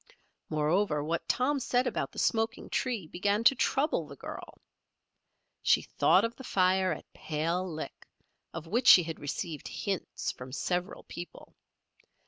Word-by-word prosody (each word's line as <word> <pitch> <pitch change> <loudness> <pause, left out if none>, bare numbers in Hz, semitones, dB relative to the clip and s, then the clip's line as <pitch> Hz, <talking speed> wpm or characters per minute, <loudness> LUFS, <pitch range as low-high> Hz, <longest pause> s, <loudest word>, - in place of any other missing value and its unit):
Moreover, 155 +1 +1
what 165 +2 -3
Tom 275 +3 +2
said 245 0 +1
about 245 - -2
the - - -15
smoking 225 +1 0
tree 240 -8 -1
began 200 +6 0
to 250 - +7
trouble 270 - +1
the 140 - -10
girl. - - -9 1.0
She - - +4
thought 195 - +3
of 230 +1 -4
the 265 - -10
fire 185 -3 +2
at 150 - -7
Pale 170 +4 -2
Lick, 155 0 -7 0.4
of 165 -1 -7
which 235 +9 0
she 185 -7 +10
had 165 -1 -6
received 150 +2 -4
hints 195 -3 -3
from 125 +1 -10
several 180 +5 -2
people. 175 0 -10
185 Hz, 145 wpm, -30 LUFS, 160-230 Hz, 1.0 s, she